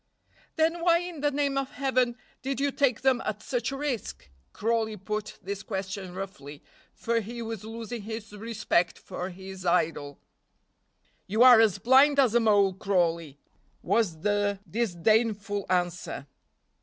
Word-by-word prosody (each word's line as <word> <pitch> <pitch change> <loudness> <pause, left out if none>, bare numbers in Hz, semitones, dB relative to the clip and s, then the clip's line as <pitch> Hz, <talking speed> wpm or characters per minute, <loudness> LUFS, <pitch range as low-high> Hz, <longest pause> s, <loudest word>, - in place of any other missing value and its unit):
"Then 330 +1 +1
why 340 0 +5
in 350 -3 -6
the 290 - +3
name 280 -1 0
of 270 -1 -5
Heaven 255 -2 +1 0.2
did 270 +1 -3
you 280 0 +1
take 260 -5 +1
them 265 -1 +3
at - - -4
such - - -2
a 275 - -4
risk?" 255 - -4 0.2
Crawley 220 -1 -1
put 215 +2 -5
this 200 0 -4
question 190 -3 -5
roughly, 150 -7 -8 0.3
for 230 0 -1
he 230 +2 -7
was 225 -3 -6
losing 230 +1 -6
his 220 0 -7
respect 210 -5 0
for 180 - -6
his 190 0 -9
idol. 160 -5 0 1.1
"You 220 +5 +3
are 250 -3 +9
as 215 -4 +3
blind 265 +7 +5
as 255 -5 +4
a 240 - +5
mole, 205 -4 +4
Crawley," 170 -6 0 0.5
was 175 -9 0
the 205 0 0
disdainful 215 0 0
answer. 175 -5 -1
215 Hz, 145 wpm, -27 LUFS, 190-250 Hz, 1.1 s, are